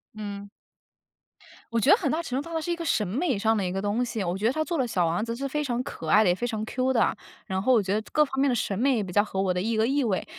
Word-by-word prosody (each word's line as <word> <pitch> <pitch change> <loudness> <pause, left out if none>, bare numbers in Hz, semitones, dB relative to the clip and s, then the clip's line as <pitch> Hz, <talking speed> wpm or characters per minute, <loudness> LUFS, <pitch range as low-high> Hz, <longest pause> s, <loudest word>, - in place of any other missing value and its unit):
嗯。 205 -1 -7 1.2
我 230 - 0
觉 265 - +4
得 - - +7
很 - - -1
大 320 - 0
程 260 -4 -2
度 - - -8
上 335 - -8
它 320 - 0
是 345 - -3
一 - - +1
个 335 - -5
审 215 -8 +1
美 250 - -1
上 220 +2 +2
的 200 - 0
一 180 - -2
个 195 - -2
东 205 +4 0
西， 230 -4 -3
我 175 +1 -2
觉 210 +3 +1
得 245 - +1
它 315 - 0
做 335 +1 -2
了 260 -3 +1
小 180 -6 +1
王 170 +5 0
子 230 0 -3
是 270 +3 -4
非 300 +2 -2
常 250 -4 -1
可 210 - -7
爱 210 +7 +5
的， 195 - +3
也 175 - +3
非 240 +6 -3
常 220 -3 -3
Q 255 +4 -1
的。 240 - +3 0.3
然 190 0 -2
后 255 +6 +3
我 225 -4 +4
觉 190 +1 -1
得 215 - +1
各 305 - +5
方 270 -2 -4
面 280 - +3
的 250 - +1
审 200 -4 -1
美 270 +4 +3
也 220 - 0
比 185 - -7
较 205 - +4
合 195 -2 -3
我 190 -1 +1
的 180 - -1
一 225 +4 -1
个 220 0 +2
意 275 +4 +1
味。 205 -6 -1
225 Hz, 360 characters per minute, -26 LUFS, 200-270 Hz, 1.2 s, 得